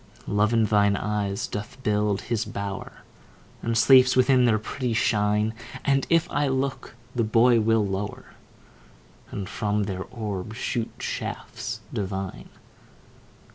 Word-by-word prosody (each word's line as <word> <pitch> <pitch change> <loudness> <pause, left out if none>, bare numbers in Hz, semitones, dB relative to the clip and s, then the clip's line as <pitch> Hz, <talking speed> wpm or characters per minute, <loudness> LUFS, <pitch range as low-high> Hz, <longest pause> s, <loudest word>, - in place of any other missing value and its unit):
Love 105 +1 +2
in 115 -2 +3
thine 100 -1 +3
eyes 100 -2 -2
doth 105 +4 -6
build 105 -1 +1
his 115 -2 -1
bower, 100 -3 -6 0.6
And 115 0 -1
sleeps 130 +1 +6
within 130 0 +5
their 115 -3 +4
pretty 120 +3 -3
shine; 105 0 +2 0.3
And 135 -1 +2
if 165 -1 +3
I 145 0 +1
look, 135 0 -2 0.2
the 120 - +1
boy 115 +2 +4
will 110 -1 +3
lower, 100 +1 -5 1.0
And 100 -2 -5
from 105 0 -1
their 95 -2 -4
orbs 110 -2 -5
shoot 115 -2 -2
shafts - - -5
divine. 95 -1 -4
110 Hz, 130 wpm, -25 LUFS, 105-120 Hz, 1.0 s, sleeps